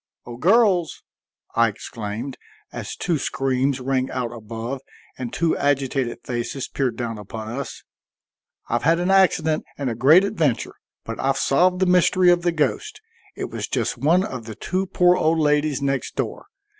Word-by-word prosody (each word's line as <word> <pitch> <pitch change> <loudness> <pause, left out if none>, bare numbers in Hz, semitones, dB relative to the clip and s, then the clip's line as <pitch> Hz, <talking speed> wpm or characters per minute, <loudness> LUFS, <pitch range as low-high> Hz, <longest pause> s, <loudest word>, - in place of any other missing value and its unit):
"O 120 - -8
girls!" 185 - +3 0.5
I 115 0 +4
exclaimed, 110 +3 -6 0.3
as - - -5
two 170 -4 -1
screams 135 0 0
rang 130 0 -1
out 120 -2 -3
above 115 +3 -6 0.3
and 125 -2 -5
two 165 -1 +1
agitated 135 -3 0
faces 120 +2 -3
peered 135 -3 -1
down 115 -3 -4
upon 110 +2 -7
us. 135 +4 -6 0.8
"I've - - 0
had 165 +4 +3
an 180 +2 +1
accident 165 -5 +3
and 135 -4 -2
a - - -2
great 145 - +6
adventure, 160 - 0 0.3
but 115 - -6
I've 135 0 +1
solved 180 +8 +3
the 190 - +3
mystery 180 0 +4
of 175 0 +3
the 175 0 +1
ghost. 150 -5 -1 0.4
It - - -5
was - - -4
just - - -1
one 170 +6 +3
of 125 - -6
the 110 -1 -7
two 185 +2 -2
poor 180 0 +4
old 160 0 +2
ladies 150 -2 +1
next 135 -1 -1
door. - - -4
140 Hz, 165 wpm, -22 LUFS, 120-170 Hz, 0.8 s, great